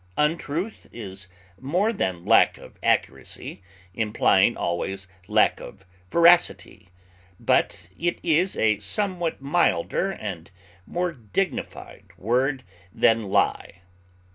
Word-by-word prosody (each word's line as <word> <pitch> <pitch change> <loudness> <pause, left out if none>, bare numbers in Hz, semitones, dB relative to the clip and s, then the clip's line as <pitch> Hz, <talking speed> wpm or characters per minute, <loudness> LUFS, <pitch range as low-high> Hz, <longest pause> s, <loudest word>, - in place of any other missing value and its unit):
Untruth 165 +6 -1
is 100 -4 -7 0.3
more 180 - 0
than 95 - -2
lack - - +5
of - - -14
accuracy, 65 +7 -2 0.3
implying 110 0 +2
always 95 +3 -3 0.2
lack - - +3
of 95 - -11 0.2
veracity; 170 - +3 0.5
but - - +1
it 175 +1 -1
is 175 +3 +2
a 110 -2 +2
somewhat 175 - -2
milder 140 - +1
and 100 - -7 0.4
more 180 0 -1
dignified 115 - -4
word 125 +7 0 0.3
than 110 0 +2
lie. 90 - 0
125 Hz, 100 wpm, -24 LUFS, -, 0.5 s, lack